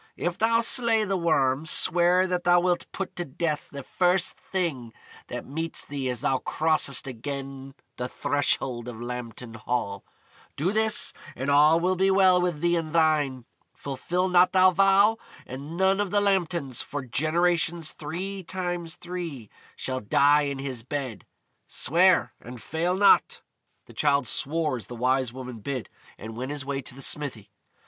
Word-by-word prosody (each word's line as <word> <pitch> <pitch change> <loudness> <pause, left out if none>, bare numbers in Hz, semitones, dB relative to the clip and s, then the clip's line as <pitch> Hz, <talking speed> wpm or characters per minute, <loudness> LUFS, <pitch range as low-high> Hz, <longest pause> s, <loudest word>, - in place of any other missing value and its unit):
"If 175 0 -3
thou 230 +1 +3
slay 230 -2 +3
the 195 -1 -1
Worm, 155 -4 +1
swear 175 +3 +3
that 180 -1 -2
thou 175 0 +5
wilt 175 0 -1
put 195 - -5
to 175 - -1
death 150 0 -3
the 140 -1 -8
first 180 +3 +1
thing 145 -12 -4 0.3
that - - -6
meets 160 +4 -4
thee 140 -2 -4
as 125 -2 -3
thou 130 +1 +1
crossest 155 -2 0
again 135 +1 -6 0.2
the 125 - -3
threshold 130 -4 0
of 120 -3 -7
Lambton 120 -1 -6
Hall. 110 -3 -3 0.5
Do 170 +7 0
this, 220 0 +1 0.2
and 130 +3 -2
all 150 +3 +5
will 185 +2 +1
be 190 +1 +2
well 190 -2 +5
with 175 -4 -1
thee 175 0 +2
and 160 -2 -3
thine. 150 -6 +1 0.3
Fulfil 170 +7 -2
not 180 0 +4
thou 185 0 +6
vow, 195 +4 +4 0.3
and 140 +6 -8
none 190 +1 +3
of 205 - -2
the 205 - +2
Lambtons, 175 - 0
for 145 -1 -5
generations 165 +4 +1
three 185 +6 -5
times 175 -2 -4
three, 165 - -7 0.2
shall 130 -1 -3
die 145 +6 +3
in 140 - -4
his 135 -3 -5
bed. 130 -3 -5 0.4
Swear, 180 +6 +2
and 125 +1 -10
fail 165 - -1
not." 200 +1 +4 0.4
The - - -15
Childe 140 -2 +2
swore 150 +2 +1
as 115 - -8
the 120 - -8
Wise 130 +1 +1
Woman 125 -2 -8
bid, 130 +1 -5 0.3
and 110 0 -8
went 130 +3 -5
his 145 -2 -4
way 140 0 -3
to 125 - -7
the 135 - -6
smithy. 120 -9 -1
155 Hz, 165 wpm, -26 LUFS, 130-180 Hz, 0.5 s, thou